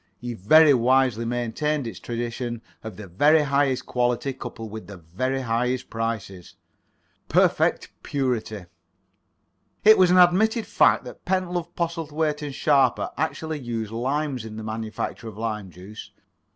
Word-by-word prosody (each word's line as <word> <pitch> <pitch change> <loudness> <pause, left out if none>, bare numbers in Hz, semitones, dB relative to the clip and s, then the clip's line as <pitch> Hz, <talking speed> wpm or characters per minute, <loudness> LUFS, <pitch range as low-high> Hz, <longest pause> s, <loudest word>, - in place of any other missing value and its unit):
He 120 0 -5
very 145 - +6
wisely 125 -2 +2
maintained 120 +5 -1
its 115 - -7
tradition 120 0 -4 0.2
of 110 -4 -8
the 105 - -8
very 145 - +4
highest 140 -2 +1
quality 125 +2 0
coupled 115 -4 -8
with 110 0 -8
the 100 - -9
very 130 +12 -3
highest 125 +1 -1
prices. 115 -5 -4 0.7
"Perfect - - +2
Purity." 120 -7 -2 1.2
It 215 0 +7
was 185 -1 +6
an 180 - +4
admitted 210 +6 +4
fact - - +3
that - - -11
Pentlove, 180 -2 -2
Postlethwaite 160 -3 -2
and 145 -2 -5
Sharper 145 -4 +2
actually 160 +1 -3
used 115 -4 -4
limes 135 +2 -2
in 110 -1 -8
the 110 - -6
manufacture 110 +1 -5
of 105 -2 -9
lime 110 -3 -4
juice. 95 +4 -11
125 Hz, 140 wpm, -24 LUFS, 110-150 Hz, 1.2 s, It